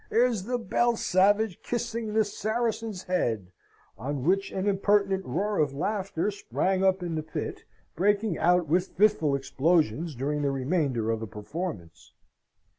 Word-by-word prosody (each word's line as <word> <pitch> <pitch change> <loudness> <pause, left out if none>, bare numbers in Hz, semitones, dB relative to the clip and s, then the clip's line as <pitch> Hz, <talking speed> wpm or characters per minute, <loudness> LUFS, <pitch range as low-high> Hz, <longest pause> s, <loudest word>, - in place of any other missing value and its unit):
here's 230 -5 +2
the 245 +2 -1
Belle 240 +1 +1
Savage 205 0 +2
kissing 230 -2 -3
the 220 -1 +4
Saracen's 220 -1 -2
Head;" 115 - -1 0.5
on 135 +3 -3
which 195 +5 +1
an 190 +1 -2
impertinent 200 -1 +2
roar 205 +4 -1
of 140 -2 +1
laughter 195 +2 -1
sprang 190 -1 -1
up 190 -1 +2
in 170 -2 -3
the 155 - -1
pit, 155 - -5 0.3
breaking 205 +1 +2
out 180 0 +3
with 180 +5 +2
fitful 185 -8 +3
explosions 150 +1 +1
during 145 +4 -1
the 140 - +1
remainder 135 -4 0
of 115 - -1
the 110 - -5
performance. 105 - -7
185 Hz, 145 wpm, -27 LUFS, 145-205 Hz, 0.5 s, the